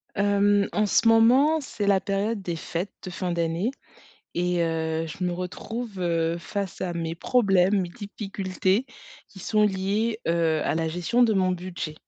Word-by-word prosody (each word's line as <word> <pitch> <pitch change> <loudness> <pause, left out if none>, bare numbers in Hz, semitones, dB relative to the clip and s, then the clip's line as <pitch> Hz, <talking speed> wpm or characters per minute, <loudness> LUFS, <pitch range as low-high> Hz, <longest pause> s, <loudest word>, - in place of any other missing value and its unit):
Hem, 205 0 +3
en 210 - +1
ce 220 +3 +3
moment, 255 +8 +5
c'est 215 -6 -4
la 195 -1 +4
période 205 +2 -1
des 175 -3 -3
fêtes 170 +4 -4
de 185 - -5
fin 180 0 -3
d'année 170 +6 0 0.6
et 180 0 +1
heu, 160 0 -1
je 165 +3 -5
me 180 - 0
retrouve, 195 +5 -5
heu, 170 -2 0
face 195 +2 -5
à 180 - -2
mes 165 -1 -3
problèmes, 195 -1 +3
mes 180 - -3
difficultés 195 0 -2 0.4
qui 195 - -14
sont 210 +3 +1
liés, 210 +3 0
heu, 165 -2 +2
à - - 0
la 160 0 0
gestion 180 +9 +1
de 230 -2 +4
mon 185 -2 +2
budget. 180 -3 -5
190 Hz, 170 wpm, -25 LUFS, 170-210 Hz, 0.6 s, moment